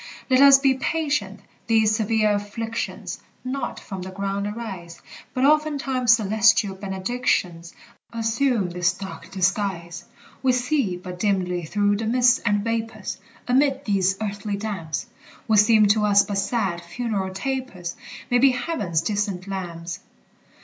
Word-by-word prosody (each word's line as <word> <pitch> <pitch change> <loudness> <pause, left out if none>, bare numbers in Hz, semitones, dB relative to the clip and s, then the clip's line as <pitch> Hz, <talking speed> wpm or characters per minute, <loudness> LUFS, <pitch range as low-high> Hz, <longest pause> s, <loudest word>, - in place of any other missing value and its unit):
Let 255 +1 +5
us 280 -1 +9
be 270 -1 +3
patient! 265 -8 -2 0.3
These 220 -2 +3
severe 215 -1 +2
afflictions 225 +3 -4 0.3
Not 265 +2 -3
from 190 -3 -7
the 185 - -6
ground 195 +1 -3
arise, 190 -6 -7 0.4
But 255 +1 +2
oftentimes 280 -5 +3
celestial 215 -1 +3
benedictions 190 -3 -2 0.4
Assume 230 -3 0
this 175 0 +1
dark 195 +1 -9
disguise. 185 -3 -1 0.4
We 260 -1 +3
see 250 -6 0
but 180 0 -9
dimly 180 -4 0
through 205 +4 +1
the 220 +1 -3
mists 245 +1 +4
and 205 -2 0
vapors; 225 -3 -3 0.3
Amid 275 +2 +2
these 195 -2 +1
earthly 205 -1 -3
damps 200 -4 -4 0.4
What 220 -2 +4
seem 215 0 +6
to 210 +1 +3
us 205 -1 +5
but 200 -1 -2
sad, 195 -4 -1
funereal 195 0 -3
tapers 195 -5 -4 0.4
May 245 - +4
be 265 +1 +5
heaven's 205 - -1
distant 200 -2 -2
lamps. 175 -3 -5
210 Hz, 135 wpm, -23 LUFS, 190-240 Hz, 0.4 s, us